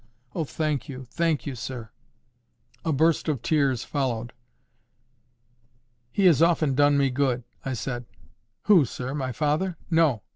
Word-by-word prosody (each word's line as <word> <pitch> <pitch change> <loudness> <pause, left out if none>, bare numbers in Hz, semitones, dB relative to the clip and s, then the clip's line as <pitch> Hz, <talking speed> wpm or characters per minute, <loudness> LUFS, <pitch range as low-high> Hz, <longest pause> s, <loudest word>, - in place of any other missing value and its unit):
"Oh! 165 - -1
thank 150 -1 -2
you, 130 -1 -7
thank 160 -1 -1
you, 140 - -3
sir." 120 -2 -6 0.9
A 160 - 0
burst 160 +4 +2
of 135 -6 -2
tears 135 -3 +1
followed. 120 -5 -2 1.8
"He 200 - +1
has 165 -5 +6
often 165 -4 +3
done 145 +1 +4
me 140 -2 +2
good," 125 -2 0 0.2
I 135 - -3
said. 120 +1 -4 0.6
"Who, 195 -7 +6
sir? 125 +2 -5
My 130 -3 -2
father?" 155 - 0
"No. 155 - +3
140 Hz, 140 wpm, -26 LUFS, 125-160 Hz, 1.8 s, has